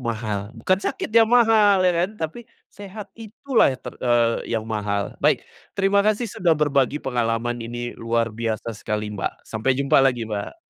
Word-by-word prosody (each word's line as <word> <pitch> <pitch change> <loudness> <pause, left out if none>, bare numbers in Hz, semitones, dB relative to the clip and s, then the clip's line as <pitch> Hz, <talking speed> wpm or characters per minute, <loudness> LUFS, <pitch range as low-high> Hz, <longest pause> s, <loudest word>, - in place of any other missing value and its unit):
mahal. 110 -4 -3
Bukan 185 +12 +1
sakit 210 - -4
yang 225 -1 +5
mahal, 220 -5 +5
ya 180 - +4
kan? 190 - -5
Tapi, 210 +7 -6 0.2
sehat 205 +1 -10
itulah 230 - +1
yang 130 - -9
ter - - -6
eee, 120 -1 +2 0.2
yang 110 - -3
mahal. 105 -3 -2
Baik, - - +2 0.3
terima 200 0 +3
kasih 215 +3 +1
sudah 170 -4 +1
berbagi 140 -2 +1
pengalaman. 120 -1 -1
Ini 120 +1 -5
luar 115 0 0
biasa 115 0 -3
sekali, 105 0 -4
Mbak. 105 - -5
Sampai 120 +4 -1
jumpa 140 0 +3
lagi, 125 -3 +2
Mbak! 105 - -5
125 Hz, 170 wpm, -23 LUFS, -, 0.3 s, yang